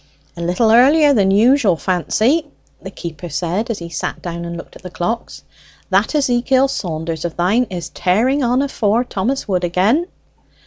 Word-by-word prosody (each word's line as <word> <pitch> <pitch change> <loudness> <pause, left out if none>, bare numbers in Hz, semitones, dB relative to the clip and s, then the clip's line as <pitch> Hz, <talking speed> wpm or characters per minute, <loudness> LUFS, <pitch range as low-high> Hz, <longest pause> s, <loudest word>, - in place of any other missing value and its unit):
"A 170 - -7
little 180 +7 +1
earlier 285 +5 +5
than 200 -6 +3
usual, 220 0 +4
Fancy," 215 - 0 0.3
the 190 - -7
keeper 170 -3 -8
said, 175 +10 -2
as 230 - -2
he 170 -1 -8
sat - - -4
down 170 -1 -6
and 170 0 -6
looked 170 - -11
at - - -13
the 180 - -8
clocks. 205 +7 -4 0.5
"That - - +2
Ezekiel 265 -1 +2
Saunders 160 - -4
o' 175 - -1
thine 190 +9 +1
is 175 -3 -6
tearing 240 +10 +1
on 250 +3 +2
afore 230 -4 0
Thomas 245 +3 -3
Wood 185 -3 -1
again." 200 - +1
200 Hz, 170 wpm, -18 LUFS, 175-250 Hz, 0.5 s, earlier